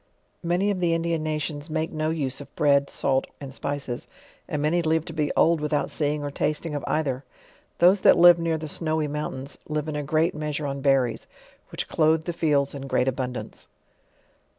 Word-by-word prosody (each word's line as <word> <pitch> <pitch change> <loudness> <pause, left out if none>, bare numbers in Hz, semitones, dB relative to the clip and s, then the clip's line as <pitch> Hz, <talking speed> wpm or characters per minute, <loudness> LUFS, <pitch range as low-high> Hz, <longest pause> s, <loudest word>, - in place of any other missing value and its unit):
Many 180 +4 +1
of 195 - -2
the 170 -2 +2
Indian 165 -1 -1
nations 155 0 -3
make 160 +1 -2
no 155 0 -1
use 145 -4 -2
of 145 - -13
bread, 140 -1 +3
salt, 135 -1 0
and 140 -2 -8
spices; 140 -3 -4 0.4
and 150 - -2
many 155 +4 +2
live 160 -1 +1
to 165 - -7
be 150 -2 0
old 165 -1 +4
without 150 -1 0
seeing 150 -1 -1
or 145 - -3
tasting 150 +2 -1
of 145 - -3
either. 135 -4 -1 0.5
Those 185 +3 +5
that - - +6
live 175 0 +8
near 165 -1 0
the 155 0 -6
snowy 155 0 -1
mountains, 145 -2 -5
live 150 0 -2
in 155 - -3
a 150 - -1
great 155 +4 +1
measure 150 -1 -3
on 140 -1 -3
berries, 135 -4 +1 0.4
which - - -4
clothe 160 0 +2
the 175 - -3
fields 145 -4 +1
iu 140 - -6
great 135 -2 0
abundance. 125 -1 -4
150 Hz, 190 wpm, -25 LUFS, 140-160 Hz, 0.5 s, live